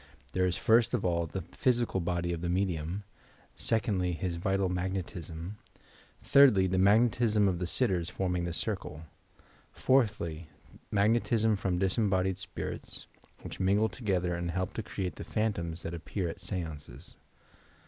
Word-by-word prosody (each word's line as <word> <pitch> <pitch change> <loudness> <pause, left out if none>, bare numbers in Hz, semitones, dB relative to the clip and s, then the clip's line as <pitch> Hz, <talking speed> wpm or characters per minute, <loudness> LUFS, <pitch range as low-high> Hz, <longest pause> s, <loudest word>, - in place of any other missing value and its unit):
There 90 0 +2
is 90 - -1
first 115 +2 +4
of 105 - -2
all 85 -1 +1
the 95 +4 -5
physical 120 -6 0
body 85 0 -1
of 85 - -4
the 85 - -2
medium, 90 0 -1 0.5
secondly 95 - 0
hia 90 +2 -2
vital 95 +3 0
magnetism, 90 0 -4 0.7
thirdly 130 -9 +6
the 95 0 +1
magnetism 110 +1 +4
of 90 -3 0
the 90 - -2
sitters 90 -6 +1
form 90 0 -1
ing 85 -1 -1
the 85 - -2
circle, 80 -2 -3 0.7
fourthly, 105 - +1 0.4
magnetism 110 +1 +2
from 95 -3 -1
disembodied 95 -1 +1
spirits, 100 - -6 0.4
which - - -7
mingle 100 +4 +3
together 90 -4 -1
and 85 0 -2
help 90 +1 -2
to - - -3
create 95 -4 -4
the - - -6
phantoms 85 -6 -2
that 85 - -4
appear 85 +2 -3
at 80 - -6
seances. 80 - -6
95 Hz, 145 wpm, -30 LUFS, 85-105 Hz, 0.7 s, thirdly